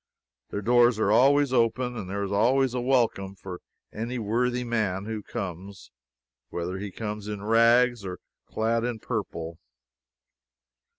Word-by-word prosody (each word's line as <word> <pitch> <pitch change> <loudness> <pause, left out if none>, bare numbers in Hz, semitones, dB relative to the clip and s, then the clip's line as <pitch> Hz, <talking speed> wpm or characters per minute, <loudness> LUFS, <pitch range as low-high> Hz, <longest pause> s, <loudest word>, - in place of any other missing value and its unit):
Their 100 - -4
doors 120 0 +4
are 105 -2 +2
always 140 +4 +4
open, 125 +1 +1
and 100 -5 -6
there 100 +1 -2
is 100 - -4
always 125 +5 +3
a 125 - -1
welcome 115 -7 +1
for 95 -2 -8 0.3
any 115 +3 -4
worthy 120 +3 0
man 105 -5 -1
who 110 -1 -4
comes, 95 0 -7 0.6
whether 90 +2 -4
he 100 +1 -5
comes 105 +1 -5
in 105 -1 -5
rags 115 +1 +4
or 90 -1 -5 0.3
clad 115 +1 0
in 120 -1 -2
purple. 85 -8 -5
110 Hz, 140 wpm, -26 LUFS, 100-120 Hz, 0.6 s, doors